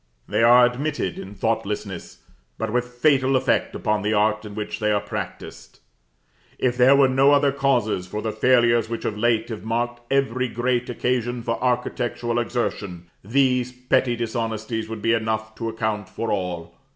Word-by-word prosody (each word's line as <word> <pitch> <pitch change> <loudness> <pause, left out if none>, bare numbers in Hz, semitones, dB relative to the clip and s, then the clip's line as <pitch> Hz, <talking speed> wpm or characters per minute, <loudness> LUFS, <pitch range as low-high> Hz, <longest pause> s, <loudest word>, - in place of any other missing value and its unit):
They - - 0
are 120 +2 +7
admitted 125 - -2
in 100 +2 -9
thoughtlessness, 105 -4 -3 0.3
but 110 -1 -3
with 125 0 +1
fatal 130 +1 +2
effect 130 0 +1
upon 105 0 0
the 105 +2 0
art 105 +1 +1
in 105 -1 -8
which 105 -1 -4
they 105 -1 +1
are 105 - +2
practised. - - -7 0.8
If 125 -1 0
there 130 +2 +6
were 140 -1 +5
no 135 +2 +4
other 140 -1 +4
causes 125 -9 0
for 105 - -4
the 110 0 -2
failures 120 0 +3
which 115 - -4
of 105 - -1
late 115 +1 +1
have 110 -3 -6
marked 120 +2 -2
every 130 -2 +1
great 120 +1 -1
occasion 120 -1 -1
for 115 +1 -2
architectural 120 -1 -1
exertion, 100 -7 -3
these 125 +2 +1
petty 125 0 +1
dishonesties 110 -1 -3
would 110 -2 -6
be 115 - +3
enough 110 -1 -1
to 115 0 -4
account 110 -3 -3
for 115 +3 -3
all. 90 -4 -3
115 Hz, 165 wpm, -23 LUFS, 110-125 Hz, 0.8 s, are